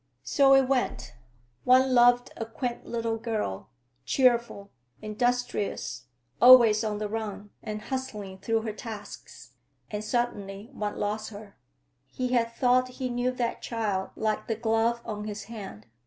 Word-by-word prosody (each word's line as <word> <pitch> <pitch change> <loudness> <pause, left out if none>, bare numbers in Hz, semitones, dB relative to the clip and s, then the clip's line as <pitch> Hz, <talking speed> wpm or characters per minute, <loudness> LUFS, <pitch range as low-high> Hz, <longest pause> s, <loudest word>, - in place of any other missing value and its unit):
So 275 -2 +5
it 270 -1 +4
went; 255 - -1 0.5
one 255 +1 +5
loved 245 0 +5
a - - -4
quaint 240 +2 -5
little 230 -1 -2
girl, 215 - -3 0.3
cheerful, 235 - +1 0.3
industrious, 215 - -2 0.3
always 235 -3 +8
on 210 -1 -2
the 210 0 -3
run 205 -2 -5
and 215 -1 -6
hustling 210 -8 -5
through 225 +3 0
her 220 -2 -3
tasks; 210 -2 -9 0.4
and 210 0 -3
suddenly 215 -2 -3
one 210 -4 -4
lost 215 +1 -2
her. 205 -1 -11 0.5
He 255 -1 -3
had 235 -2 +1
thought 250 +1 +3
he 255 -1 -2
knew 245 +1 0
that 240 -2 -2
child 210 -5 -2
like 215 -1 -1
the 225 - -1
glove 225 +1 +1
on 210 -1 -5
his 210 0 -5
hand. 200 - -9
225 Hz, 140 wpm, -27 LUFS, 210-245 Hz, 0.5 s, always